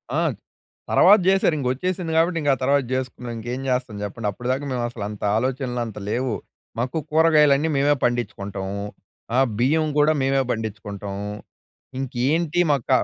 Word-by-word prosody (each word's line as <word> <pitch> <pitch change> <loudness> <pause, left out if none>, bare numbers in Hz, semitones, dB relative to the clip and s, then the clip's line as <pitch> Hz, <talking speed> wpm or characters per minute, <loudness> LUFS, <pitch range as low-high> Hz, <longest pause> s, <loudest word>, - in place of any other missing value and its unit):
ఆ! - - +2 0.7
తర్వాత 210 - +7
చేసారింక 160 -8 +2
వచ్చేసింది 180 +4 -2
కాబట్టి, 170 +1 +3
ఇంక 145 - 0
ఆ - - -12
తర్వాత 140 +1 +3
చేసుకున్నాం. 125 -2 -4
ఇంకేం 120 +4 -4
చేస్తాం 125 -4 -1
చెప్పండి. 105 +2 -4
అప్పటి 125 +4 -7
దాకా 135 +3 -2
మేము 125 -1 -1
అసలంత 105 -2 -6
ఆలోచనలు 125 0 -1
అంత 110 - -8
లేవు. 125 0 -1 0.4
మాకు 125 +6 -1
కూరగాయలన్నీ 155 -2 +4
మేమే 145 +1 +3
పండించుకుంటాం. 100 -5 -2 0.7
ఆహ్, 135 -1 +4
బియ్యం 155 +5 +2
కూడా 150 +1 +5
మేమే 135 0 +2
పండించుకుంటాం 105 -2 -5 0.8
ఇంకేంటి 145 +7 0
మక్క 140 -3 0
130 Hz, 140 wpm, -23 LUFS, 120-150 Hz, 0.8 s, తర్వాత